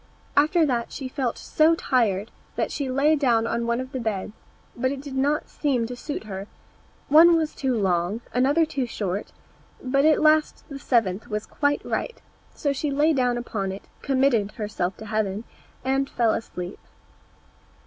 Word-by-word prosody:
After 310 +3 +4
that 240 -5 -1
she 270 - -5
felt 255 -2 -2
so 315 +2 +3
tired 225 - +1 0.2
that - - -1
she 280 -3 -3
lay 280 +4 +3
down 240 -6 +2
on 235 0 -1
one 235 +1 +1
of 260 +1 -5
the 260 - -3
beds, 215 -4 -2 0.4
but 260 +2 0
it 280 - -4
did 280 0 -8
not 285 +3 +1
seem 260 -6 0
to 245 +2 -6
suit 285 +2 -5
her; 195 -2 -6 0.6
one 330 +3 +7
was 315 -1 -1
too 260 -4 -1
long, 185 +3 0
another 280 +7 +3
too 275 -5 -2
short, 200 -3 -3 0.5
but 275 +2 +1
at 310 0 +5
last 310 0 +3
the 280 -1 -7
seventh 225 -5 +1
was 210 -1 -3
quite 290 -1 0
right; 475 - -3 0.3
and - - -29
so 285 -2 +1
she 290 +2 -2
lay 295 +3 +3
down 250 -3 +1
upon 205 -5 -3
it, 195 - -8 0.2
committed 260 -7 +2
herself 200 -4 -3
to 220 - -9
heaven, 215 -1 -1 0.4
and 270 +1 +1
fell 230 -2 +2
asleep. 180 -4 -5
255 Hz, 175 wpm, -25 LUFS, 220-285 Hz, 0.6 s, one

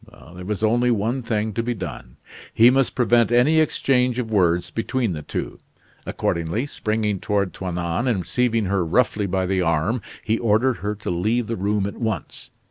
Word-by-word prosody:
There 90 0 -9
was 105 +2 -3
only 120 +3 +3
one 115 +3 0
thing 110 -2 -2
to 115 - -1
be 120 +1 -2
done. 90 - -8 0.3
He 115 +2 +6
must 135 0 +1
prevent 120 -1 +3
any 130 +7 +4
exchange 125 -5 +1
of 115 -3 -3
words 90 -3 +2
between 115 -2 -1
the 75 - -5
two. - - -5 0.5
Accordingly, 85 +9 -1
springing 110 -6 -2
toward 100 -2 -1
Toinon 90 +4 -2
and 100 -8 0
seizing 115 +4 +1
her 95 -1 0
roughly 105 +3 +1
by 95 0 0
the 95 0 0
arm, 85 +8 0 0.2
he 110 +1 0
ordered 115 +3 +2
her 105 +1 -3
to 105 -3 -5
leave 110 +8 0
the 115 +1 -3
room 100 +1 0
at 100 - -5
once. 110 -4 -4
110 Hz, 180 wpm, -22 LUFS, 95-120 Hz, 0.5 s, He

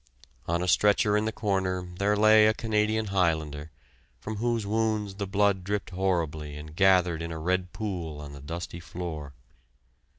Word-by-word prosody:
On 85 +1 0
a - - -2
stretcher 105 +3 +3
in 105 +1 +1
the 110 - 0
corner 95 -4 -1
there 105 +1 +2
lay 110 0 +6
a 110 - +2
Canadian 110 0 0
Highlander, 80 -5 0 0.5
from 110 -1 -5
whose 115 -1 0
wounds 110 -1 0
the 100 0 -4
blood 100 -1 +2
dripped 100 0 -3
horribly 80 -6 -1
and 75 +1 -10
gathered 90 -3 +4
in 85 0 -4
a 80 - -5
red 90 +2 -1
pool 90 -8 -4
on 75 -1 -8
the 70 - -10
dusty 85 +3 -6
floor. 80 -5 -6
95 Hz, 165 wpm, -27 LUFS, 80-105 Hz, 0.5 s, lay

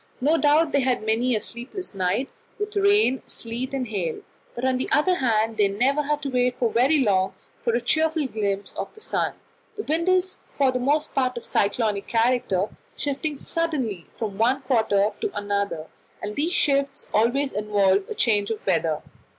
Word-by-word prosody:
No 295 +6 +3
doubt 300 +2 +4
they 280 - +3
had 255 -4 0
many 235 +3 +2
a - - +1
sleepless 245 - -7
night, 190 +7 0 0.3
with 420 0 -4
rain, 400 - +4
sleet, 240 +3 -5
and 265 -2 -2
hail; 180 -7 -2 0.3
but 240 - -3
on 260 -1 +2
the - - -2
other 360 +5 +3
hand 225 -3 +1
they 205 -2 +4
never 255 +9 +1
had 295 0 -1
to 280 - -2
wait 250 -1 +1
very 250 +5 +3
long 195 -7 +2 0.2
for 235 - 0
a - - +2
cheerful 315 +4 +1
glimpse 205 -5 -2
of - - -5
the - - -13
sun. 435 - -1 0.4
The 425 - -3
wind 335 +2 0
is 370 0 +1 0.2
for 275 -2 +4
the 255 - -1
most 290 +4 0
part 255 -2 0
of 235 - -6
cyclonic 205 -1 0
character, 225 -5 +1 0.2
shifting 290 +1 -2
suddenly 265 - -2
from 210 -3 -4
one 255 +4 +2
quarter 215 -5 +2
to 420 -3 -3
another, 200 -5 -2 0.3
and 210 0 -5
these 315 +4 0
shifts 275 -2 +1
always 255 +6 +2
involve 200 -2 +2
a - - -4
change 205 -3 +2
of 225 - -4
weather. 165 -4 +1
245 Hz, 180 wpm, -24 LUFS, 210-285 Hz, 0.4 s, doubt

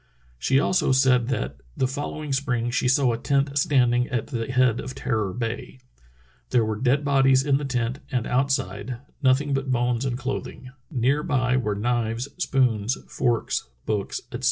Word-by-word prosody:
She 135 - +3
also 180 0 +2
said 130 -2 +4
that 70 - -2 0.2
"the 130 - +2
following 145 +2 -4
spring 120 -3 0
she 125 - +1
saw 130 -1 +3
a 115 - -3
tent 140 +2 0
standing 125 -3 +2
at 120 -3 -1
the 120 -3 -4
head 125 -3 +3
of 130 - -6
Terror 110 -7 -1
Bay. 120 +4 -4 0.7
There 120 -3 +3
were 110 -1 -3
dead 135 +3 +2
bodies 135 -1 +4
in 140 -2 +3
the 145 - -4
tent 125 0 -1
and 125 -4 0
outside 125 -3 -1
— - - -35
nothing 140 +2 +3
but 135 0 -1
bones 120 -1 +1
and 125 -3 -1
clothing. 130 -1 -5 0.2
Near 135 0 +1
by 130 -6 +1
were 110 -5 0
knives, 120 +3 -1
spoons, 125 - +1
forks, 120 - -1 0.2
books, 105 -2 -2
etc." - - -5
130 Hz, 170 wpm, -24 LUFS, 120-135 Hz, 0.7 s, said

